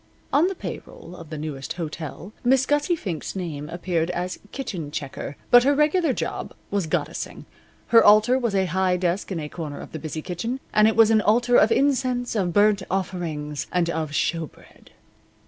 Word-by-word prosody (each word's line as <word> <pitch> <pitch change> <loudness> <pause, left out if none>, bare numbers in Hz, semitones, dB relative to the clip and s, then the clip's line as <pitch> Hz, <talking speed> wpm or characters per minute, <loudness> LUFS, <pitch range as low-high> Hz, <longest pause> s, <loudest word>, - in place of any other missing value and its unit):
On 310 +5 +5
the 385 - -3
pay - - -6
roll 175 - -12
of 165 -3 -11
the 155 - -6
Newest 145 -3 -5
Hotel 165 +3 -6
Miss 260 +1 +4
Gussie 295 +5 +1
Fink's 180 - -5
name 155 -5 -5
appeared 170 -1 -1
as 180 +1 -3
kitchen 185 - -5
checker, 140 -1 -6
but 245 0 +8
her 280 +2 +3
regular 305 +2 +3
job - - -4 0.2
was 200 -5 0
goddessing. 155 -1 -3 0.4
Her 230 -1 +7
altar 215 +5 +6
was 235 -5 -1
a 190 -1 +2
high 185 +1 +1
desk 180 +3 -1
in 180 - -2
a 150 - -4
corner 150 -2 -6
of - - -10
the 160 - -6
busy 155 0 -5
kitchen, 225 +9 -3
and 215 0 +5
it 220 - +2
was 225 -1 +6
an 220 -1 +4
altar 240 +4 +3
of - - +5
incense, 255 -4 +1
of 185 -5 0
burnt 205 +2 +4
offerings, 165 -6 -3
and 175 -2 +1
of 160 -2 -2
showbread. 160 +1 -4
185 Hz, 185 wpm, -24 LUFS, 160-235 Hz, 0.4 s, but